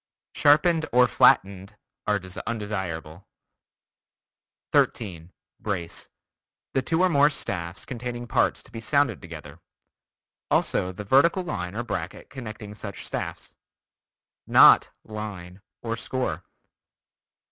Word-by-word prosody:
"Sharpened" 160 Hz, +2 st, +4 dB
or 125 Hz, +1 st, +6 dB
"flattened" 100 Hz, -2 st, +3 dB, 0.3 s
are 105 Hz, -1 st, +2 dB, 0.3 s
undesirable. 95 Hz, -7 st, -4 dB, 1.4 s
13. 90 Hz, -6 st, 0 dB, 0.3 s
Brace: 90 Hz, -6 st, -4 dB, 0.6 s
The 135 Hz, -, +2 dB
two 165 Hz, +7 st, +1 dB
or -, -, +6 dB
more 145 Hz, -2 st, +5 dB
staffs 85 Hz, -, -4 dB
containing 120 Hz, -1 st, -5 dB
parts -, -, +1 dB
to -, -, -15 dB
be 115 Hz, -, -7 dB
sounded 140 Hz, +5 st, +1 dB
together; 80 Hz, -3 st, -10 dB, 0.9 s
also 90 Hz, -, +1 dB
the 95 Hz, +3 st, -7 dB
vertical 140 Hz, -, +4 dB
line 90 Hz, -, -4 dB
or 120 Hz, -, -2 dB
bracket 95 Hz, -6 st, -5 dB
connecting 110 Hz, -5 st, -8 dB
such 105 Hz, -2 st, -7 dB
staffs. -, -, -5 dB, 0.9 s
Not -, -, +7 dB
"line" 100 Hz, -4 st, -8 dB, 0.2 s
or 115 Hz, -1 st, -2 dB
"score." 115 Hz, -9 st, -3 dB
105 Hz, 105 wpm, -25 LUFS, 90-125 Hz, 1.4 s, Not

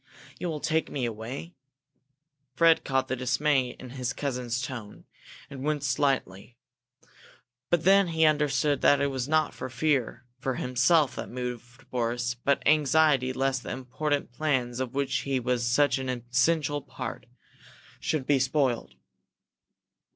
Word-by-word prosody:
You 180 Hz, -, -2 dB
will 155 Hz, -2 st, -3 dB
take 160 Hz, +2 st, 0 dB
me 130 Hz, -4 st, -2 dB
away?" 120 Hz, +9 st, -6 dB, 1.0 s
Fred 165 Hz, -1 st, +5 dB
caught 130 Hz, -1 st, 0 dB
the 130 Hz, -, -1 dB
dismay 130 Hz, +1 st, +1 dB
in 130 Hz, -2 st, -9 dB
his 130 Hz, -1 st, -3 dB
cousin's 125 Hz, -4 st, -2 dB
tone, 120 Hz, -5 st, -7 dB, 0.4 s
and 135 Hz, -2 st, -8 dB
winced 145 Hz, -3 st, 0 dB
slightly. 125 Hz, -6 st, -1 dB, 1.1 s
But 175 Hz, -2 st, +2 dB
then 195 Hz, 0 st, +5 dB
he 160 Hz, -1 st, +2 dB
understood 150 Hz, -1 st, +2 dB
that 145 Hz, -, +5 dB
it 140 Hz, 0 st, +1 dB
was 130 Hz, -1 st, -3 dB
not 155 Hz, -1 st, +2 dB
fear 130 Hz, -1 st, -1 dB
for 130 Hz, -1 st, -2 dB
himself 130 Hz, +3 st, +2 dB
that -, -, -5 dB
moved 125 Hz, 0 st, -7 dB
Boris, 120 Hz, 0 st, -1 dB
but 140 Hz, +4 st, 0 dB
anxiety 150 Hz, -3 st, +4 dB
lest 135 Hz, 0 st, 0 dB
the -, -, -8 dB
important 140 Hz, +2 st, -2 dB
plans 125 Hz, -3 st, -1 dB
of 130 Hz, 0 st, -4 dB
which 140 Hz, -1 st, 0 dB
he 135 Hz, -2 st, -1 dB
was 125 Hz, 0 st, -1 dB
such 145 Hz, +3 st, +3 dB
an 130 Hz, -1 st, -4 dB
essential 135 Hz, +5 st, 0 dB
part -, -, -7 dB, 0.7 s
should 150 Hz, -4 st, -1 dB
be 140 Hz, 0 st, +3 dB
spoiled. 130 Hz, -, 0 dB
130 Hz, 140 wpm, -27 LUFS, 125-150 Hz, 1.1 s, Fred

